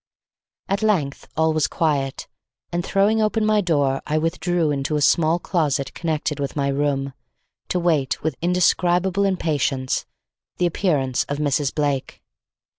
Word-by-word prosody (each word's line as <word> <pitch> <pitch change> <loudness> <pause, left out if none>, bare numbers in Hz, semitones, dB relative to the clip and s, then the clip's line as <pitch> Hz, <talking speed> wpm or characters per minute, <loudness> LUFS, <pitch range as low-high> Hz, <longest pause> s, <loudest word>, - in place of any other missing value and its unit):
At 195 0 -1
length 180 -11 0
all 160 0 +3
was 155 -2 +2
quiet, 140 -5 -1 0.4
and 175 0 -1
throwing 210 +4 +2
open 215 0 +1
my 215 -1 +3
door, 145 -7 +1
I 150 +1 0
withdrew 165 0 0
into 140 +1 -1
a - - +1
small 160 +2 +3
closet 150 -6 -1
connected 155 -3 -2
with 140 -1 -3
my 140 -1 0
room, 140 -1 -1 0.5
to 180 - 0
wait 160 -7 0
with 160 -3 -1
indescribable 180 +2 +2
impatience, 145 -8 -1 0.5
the 180 - +1
appearance 150 -8 +1
of 145 - -3
Mrs. 145 -1 0
Blake. 145 -3 -2
155 Hz, 140 wpm, -22 LUFS, 140-180 Hz, 0.5 s, all